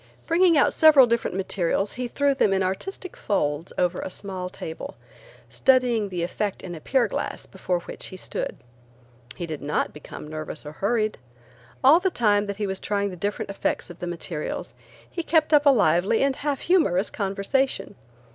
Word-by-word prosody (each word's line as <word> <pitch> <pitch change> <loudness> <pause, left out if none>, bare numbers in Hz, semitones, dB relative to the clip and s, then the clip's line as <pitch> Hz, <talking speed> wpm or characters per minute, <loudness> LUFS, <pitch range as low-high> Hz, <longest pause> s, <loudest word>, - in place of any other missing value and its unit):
Bringing 335 -1 +4
out 285 - +4
several 305 -5 +7
different 235 -5 -1
materials 195 +1 0
he 250 0 -3
threw 280 +3 +1
them 215 -7 +2
in 190 0 +2
artistic 370 - -4
folds 150 -4 -1
over 180 0 +1
a - - -4
small 185 -1 -4
table, 160 -2 -7 0.6
studying 245 -5 +3
the 180 -2 -3
effect 200 +3 -3
in 180 - -6
a 165 - -7
pier 260 - +2
glass - - -4
before 180 -2 -2
which - - -7
he 185 - -9
stood. - - -4 0.8
He 175 - -4
did 155 -3 -6
not 150 +1 -1
become 150 0 -10
nervous 155 0 -7
or 150 - -6
hurried. 215 +6 0 0.6
All 290 +6 +8
the 380 +1 +1
time 210 - +2
that 200 - -3
he 210 - -1
was 190 -1 -3
trying 200 -1 -1
the - - -7
different 200 +2 -3
effects 195 - -2
of 175 - -13
the 175 - -4
materials, 170 -2 -4 0.3
he 345 - -4
kept 320 -2 +2
up 295 0 +6
a - - +10
lively 205 - +3
and 275 -1 +2
half 285 -2 -2
humorous 220 - +2
conversation. 200 +7 -1
200 Hz, 180 wpm, -25 LUFS, 180-265 Hz, 0.8 s, a